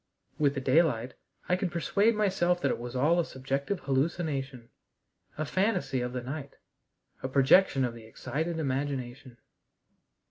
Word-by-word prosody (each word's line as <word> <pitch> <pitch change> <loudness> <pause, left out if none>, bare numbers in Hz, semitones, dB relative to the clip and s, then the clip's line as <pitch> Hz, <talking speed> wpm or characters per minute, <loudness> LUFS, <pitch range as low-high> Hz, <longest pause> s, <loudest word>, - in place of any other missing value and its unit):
With 145 -2 +2
the 135 - -2
daylight 130 -5 +2 0.3
I 180 - +3
could 180 -1 -2
persuade 200 +6 +2
myself 185 -4 +1
that 140 - +2
it - - -2
was 120 +1 -7
all 155 +7 +3
a - - +3
subjective 140 +6 -3
hallucination, 135 -3 -2 0.7
a 155 - -1
fantasy 170 - 0
of 125 0 -3
the 125 -1 -4
night, 140 +2 -6 0.7
a - - -2
projection 135 +1 +4
of 120 - -3
the 115 -1 -12
excited 160 +8 -3
imagination. 135 -3 -3
140 Hz, 145 wpm, -29 LUFS, 130-170 Hz, 0.7 s, projection